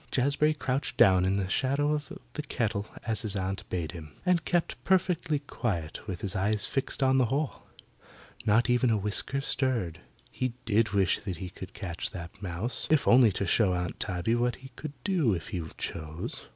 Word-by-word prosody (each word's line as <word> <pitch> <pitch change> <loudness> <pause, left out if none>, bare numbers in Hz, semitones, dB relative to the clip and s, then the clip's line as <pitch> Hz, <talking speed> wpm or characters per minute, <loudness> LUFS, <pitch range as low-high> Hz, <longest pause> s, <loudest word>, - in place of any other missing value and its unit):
Jazbury 145 +4 +2
crouched 125 -4 -2
down 95 -1 +6
in 95 +1 +2
the 95 -2 0
shadow 140 +8 +1
of 150 +3 -3 0.2
the 150 - -3
kettle 110 -7 -2 0.2
as 110 -2 +1
his 105 -3 -2
aunt 95 0 -3
bade 85 -4 -2
him, 75 -4 -9
and 180 -3 +3
kept 175 -2 0
perfectly 180 -4 +2
quiet 105 - -3
with 95 -3 -4
his 100 0 -1
eyes 100 +2 +1
fixed 135 0 -1
on 130 0 +4
the 130 - +4
hole. 140 +4 -2 0.8
Not 110 +3 +4
even 125 0 +3
a 110 - +3
whisker 105 +7 -1
stirred. 125 - 0 0.3
He 130 -2 -2
did 110 0 +3
wish 95 -3 +3
he 90 -1 -5
could - - -9
catch 85 -3 -4
that 85 +1 -9
mouse, 100 +7 -1
if 155 -3 +3
only 120 -3 +7
to 100 - -1
show 95 0 +3
Aunt 90 -1 -3
Tabby 95 +3 -1
what 120 +1 +1
he 135 0 -12
could 140 +4 -8
do 165 - +2
if 85 - -6
he 95 -6 -2 0.2
chose. 80 +1 -4
110 Hz, 185 wpm, -29 LUFS, 95-135 Hz, 0.8 s, only